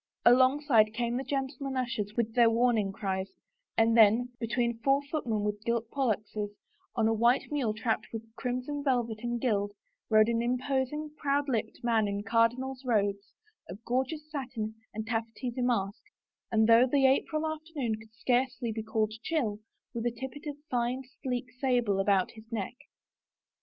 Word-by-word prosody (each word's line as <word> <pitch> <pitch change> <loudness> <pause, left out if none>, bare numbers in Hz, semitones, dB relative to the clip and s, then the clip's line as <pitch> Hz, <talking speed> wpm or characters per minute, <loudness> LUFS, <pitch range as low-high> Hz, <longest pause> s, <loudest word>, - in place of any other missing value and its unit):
Alongside 255 -3 +5
came 235 0 -1
the 265 - -2
gentlemen 270 0 -3
ushers 235 -5 -2
with 225 -1 0
their 235 -1 +6
warning 225 -3 +2
cries 195 -2 -3 0.5
and 225 0 +4
then, 230 +2 +6
between 235 0 -1
four 275 +3 +2
footmen 230 -9 -1
with 210 0 -2
gilt 235 0 -1
pollaxes, 215 -5 -1 0.5
on 225 -2 +3
a 225 - +3
white 235 +6 +2
mule 250 -8 0
trapped 225 0 -1
with 225 0 -8
crimson 255 +3 -3
velvet 240 -5 0
and 240 0 -2
gilt, 205 -5 0 0.4
rode 215 -1 +6
an 230 0 +1
imposing, 265 +4 -1
proud 285 0 0
lipped 240 -3 -2
man 225 -3 +2
in 200 0 -2
cardinal's 245 +5 +1
robes 205 -4 0 0.4
of 200 +6 -9
gorgeous 265 +5 -1
satin 240 -7 -4 0.2
and 220 +1 -5
taffety 225 +2 -3
damask, 235 -5 -1 0.5
and 220 -1 +4
though 230 +2 +7
the 270 +1 +3
April 305 +4 +2
afternoon 315 -6 -3
could 220 0 -8
scarcely 245 0 0
be 220 0 -3
called 220 0 -1
chill, 245 -10 -1 0.3
with 230 - -3
a 240 - +2
tippet 265 +5 -7
of 290 -1 -4
fine, 245 +1 0 0.2
sleek 250 -3 -2 0.2
sable 240 -7 +2
about 195 -1 +2
his 225 +1 -15
neck. 210 -4 -3
235 Hz, 155 wpm, -30 LUFS, 220-260 Hz, 0.5 s, though